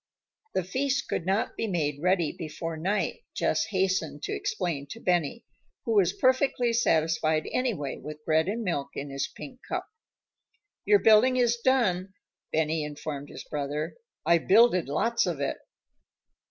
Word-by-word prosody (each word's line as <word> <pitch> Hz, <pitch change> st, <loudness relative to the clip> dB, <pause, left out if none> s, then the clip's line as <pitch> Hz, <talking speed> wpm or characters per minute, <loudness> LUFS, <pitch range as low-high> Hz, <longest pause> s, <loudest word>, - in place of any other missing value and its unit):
The 185 Hz, -, +1 dB
feast 265 Hz, +9 st, -1 dB
could 170 Hz, -, -3 dB
not 195 Hz, +3 st, 0 dB
be 225 Hz, -, -2 dB
made 150 Hz, -7 st, -1 dB
ready 180 Hz, -3 st, +2 dB
before 165 Hz, +1 st, -5 dB
night, 195 Hz, -, -1 dB
Jess -, -, +1 dB
hastened 190 Hz, -2 st, -1 dB
to -, -, -3 dB
explain 170 Hz, -, -2 dB
to 225 Hz, -, -8 dB
Benny, 175 Hz, +3 st, 0 dB, 0.4 s
who 230 Hz, -, -1 dB
was 190 Hz, -4 st, +4 dB
perfectly 255 Hz, 0 st, +2 dB
satisfied 160 Hz, -7 st, +2 dB
anyway 210 Hz, -, -1 dB
with 150 Hz, +2 st, -9 dB
bread 160 Hz, +1 st, +2 dB
and 230 Hz, +3 st, -2 dB
milk 145 Hz, -8 st, -2 dB
in 140 Hz, 0 st, -5 dB
his 135 Hz, 0 st, -2 dB
pink 255 Hz, -3 st, -11 dB
cup. -, -, -2 dB, 1.0 s
"Your 415 Hz, -, +6 dB
building 245 Hz, -, +5 dB
is 240 Hz, -1 st, +3 dB
done," 195 Hz, -8 st, +2 dB, 0.4 s
Benny 160 Hz, 0 st, +1 dB
informed 145 Hz, -1 st, -6 dB
his -, -, -8 dB
brother. 150 Hz, +1 st, -3 dB, 0.3 s
"I 170 Hz, 0 st, +5 dB
builded 195 Hz, -, +4 dB
lots 230 Hz, +10 st, +1 dB
of 165 Hz, -5 st, -2 dB
it." 140 Hz, -, -1 dB
180 Hz, 150 wpm, -27 LUFS, 155-230 Hz, 1.0 s, Your